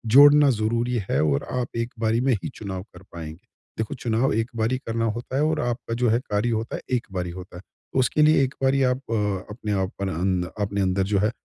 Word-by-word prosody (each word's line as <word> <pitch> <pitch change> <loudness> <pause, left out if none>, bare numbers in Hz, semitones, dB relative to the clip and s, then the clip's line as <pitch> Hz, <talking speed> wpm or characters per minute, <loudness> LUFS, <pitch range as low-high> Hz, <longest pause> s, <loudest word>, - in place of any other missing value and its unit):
जोड़ना 145 0 +8
ज़रूरी 115 +1 0
है - - +2
और 70 -2 +1
आप 125 -1 -1
एक 115 +1 -2
बारी 115 +1 +1
में 130 0 +3
ही - - -3
चुनाव 95 -3 -5
कर 90 +1 -13
पाएँगे। 80 0 -9 0.3
देखो 110 +4 -2
चुनाव 120 +1 0
एक 115 +2 -1
बार 110 +1 0
ही 130 - +1
करना 115 0 0
होता 125 +2 -6
है 145 - +2
और 155 0 +1
आपका 120 -1 -3
जो 120 -1 +2
है 115 - +3
कार्य 105 +4 +1
होता 115 +1 -2
है - - -5
एक 120 - -3
बार 90 -2 -2
ही 85 - -5
होता 90 0 -9
है। 90 - -9 0.3
तो 130 - +2
उसके 130 +4 +2
लिए 150 -2 +5
एक 130 - -2
बारी 135 +1 +3
आप 125 0 +2
अ, - - +1 0.3
अपने 105 0 -5
आप 95 - -2
अं, 95 -1 0 0.2
अपने 100 0 -2
अंदर 95 0 +1
जो 100 - +4
है 105 +3 +2
115 Hz, 240 wpm, -24 LUFS, 95-125 Hz, 0.3 s, जोड़ना